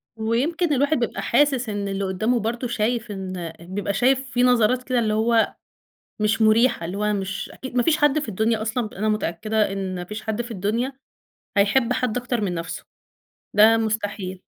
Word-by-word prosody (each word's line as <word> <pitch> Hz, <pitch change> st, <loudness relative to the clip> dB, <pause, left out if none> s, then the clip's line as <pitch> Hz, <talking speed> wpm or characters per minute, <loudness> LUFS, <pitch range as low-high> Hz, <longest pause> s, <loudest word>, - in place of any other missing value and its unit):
ويمكن 280 Hz, +10 st, 0 dB
الواحد 285 Hz, +3 st, +2 dB
بيبقى 235 Hz, -, -2 dB
حاسس 260 Hz, -2 st, +2 dB
إن 205 Hz, -1 st, -3 dB
اللي 195 Hz, 0 st, -2 dB
قُدّامه 215 Hz, +6 st, 0 dB
برضه 235 Hz, +3 st, -2 dB
شايف 230 Hz, 0 st, -1 dB
إن 185 Hz, -4 st, -5 dB
بيبقى 190 Hz, +4 st, -3 dB
شايف 265 Hz, +3 st, +2 dB
في 245 Hz, 0 st, +2 dB
نظرات 250 Hz, 0 st, +3 dB
كده 250 Hz, -1 st, 0 dB
اللي 215 Hz, -2 st, +1 dB
هو 225 Hz, +1 st, +2 dB, 0.7 s
مش 215 Hz, +1 st, +1 dB
مُريحة، 220 Hz, -3 st, +4 dB
اللي 180 Hz, +4 st, -4 dB
هو 210 Hz, 0 st, +1 dB
مش 190 Hz, -2 st, -3 dB
أكي 260 Hz, -, -7 dB
ما 245 Hz, -1 st, +1 dB
فيش 310 Hz, +2 st, +3 dB
حد 295 Hz, 0 st, +3 dB
في 290 Hz, -, -5 dB
الدنيا 220 Hz, +2 st, 0 dB
أصلًا 220 Hz, +1 st, -1 dB
ب -, -, -16 dB
أنا 215 Hz, +2 st, -1 dB
متأكدة 215 Hz, +1 st, 0 dB
إن 195 Hz, -1 st, -3 dB
ما 180 Hz, -, -4 dB
فيش 210 Hz, +4 st, -7 dB
حد 220 Hz, +1 st, -2 dB
في 240 Hz, 0 st, -8 dB
الدنيا 225 Hz, +6 st, -1 dB, 0.6 s
هيحب 230 Hz, +5 st, +3 dB
حد 250 Hz, -2 st, -1 dB
أكتر 245 Hz, -1 st, -2 dB
من 195 Hz, -4 st, -1 dB
نفسه 165 Hz, -1 st, -5 dB, 0.7 s
ده 220 Hz, +2 st, +6 dB
مستحيل. 205 Hz, -4 st, -3 dB
220 Hz, 185 wpm, -23 LUFS, 200-245 Hz, 0.7 s, ده